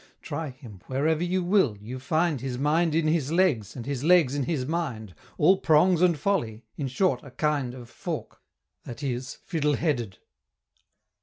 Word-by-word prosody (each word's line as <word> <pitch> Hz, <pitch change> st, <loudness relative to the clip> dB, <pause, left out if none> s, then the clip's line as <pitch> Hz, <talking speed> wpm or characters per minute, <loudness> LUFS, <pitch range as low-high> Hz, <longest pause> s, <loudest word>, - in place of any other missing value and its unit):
Try 160 Hz, -2 st, -4 dB
him, 120 Hz, -8 st, -12 dB
wherever 155 Hz, +5 st, +1 dB
you 180 Hz, +1 st, 0 dB
will, 175 Hz, -, +2 dB
you 115 Hz, +6 st, -7 dB
find 155 Hz, +1 st, 0 dB
His 130 Hz, -2 st, -3 dB
mind 155 Hz, +4 st, +2 dB
in 160 Hz, -1 st, +2 dB
his 155 Hz, -3 st, +1 dB
legs, 165 Hz, -, +1 dB
and 120 Hz, -3 st, -6 dB
his 140 Hz, -1 st, -3 dB
legs 165 Hz, -5 st, +5 dB
in 145 Hz, -2 st, -1 dB
his 135 Hz, -3 st, -1 dB
mind, 130 Hz, -, -3 dB, 0.2 s
All 185 Hz, +5 st, +5 dB
prongs 165 Hz, +2 st, +4 dB
and 175 Hz, -3 st, +4 dB
folly 140 Hz, -, -1 dB
in 140 Hz, -, -3 dB
short 135 Hz, -1 st, +1 dB
a 140 Hz, -, -12 dB
kind 140 Hz, -2 st, -1 dB
Of 125 Hz, -2 st, -10 dB
fork -, -, -6 dB, 0.4 s
that 125 Hz, +4 st, -8 dB
is 130 Hz, -1 st, -3 dB
Fiddle 150 Hz, -4 st, 0 dB
headed. 120 Hz, -, -1 dB
145 Hz, 170 wpm, -26 LUFS, 125-165 Hz, 0.4 s, legs